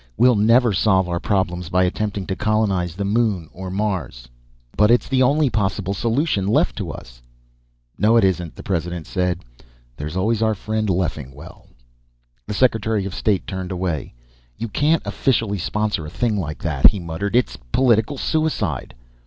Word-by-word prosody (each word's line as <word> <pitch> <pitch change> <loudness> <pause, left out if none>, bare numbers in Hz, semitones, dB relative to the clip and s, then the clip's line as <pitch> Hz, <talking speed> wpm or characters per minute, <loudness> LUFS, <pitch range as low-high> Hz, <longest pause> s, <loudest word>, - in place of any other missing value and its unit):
We'll 125 0 +5
never 115 +2 +4
solve 95 -1 +2
our 85 -1 -2
problems 90 -4 -1
by 90 0 +3
attempting 100 +1 -2
to 95 - -3
colonize 95 -6 0
the 100 +1 -3
moon 100 -6 0
or 95 +1 -7
Mars." 95 - -3 0.5
"But 105 0 +4
it's 120 +1 +3
the 130 0 +1
only 145 +3 +3
possible 100 -2 -1
solution 115 - 0
left 105 - +2
to - - -4
us." - - -10 0.8
"No 110 +5 +4
it 115 - +4
isn't," 90 -3 0
the - - -10
President 85 -3 -3
said. 90 -4 -2 0.5
"There's 75 +4 -5
always 110 +4 +1
our 110 -1 +2
friend 110 +1 -2
Leffingwell." 75 -7 -4 0.8
The - - -3
Secretary 110 -4 +1
of 100 - -5
State 100 -1 0
turned 95 -1 -5
away. 90 -8 -3 0.4
"You 115 +1 -4
can't 150 +8 +2
officially 110 -7 0
sponsor 105 -3 -1
a - - -6
thing 110 +6 -1
like 75 -6 -4
that," 75 -5 +5
he 105 -1 -3
muttered. 90 +5 -3
"It's 125 - +1
political 120 - +2
suicide." 160 +3 -1
100 Hz, 160 wpm, -21 LUFS, 90-110 Hz, 0.8 s, We'll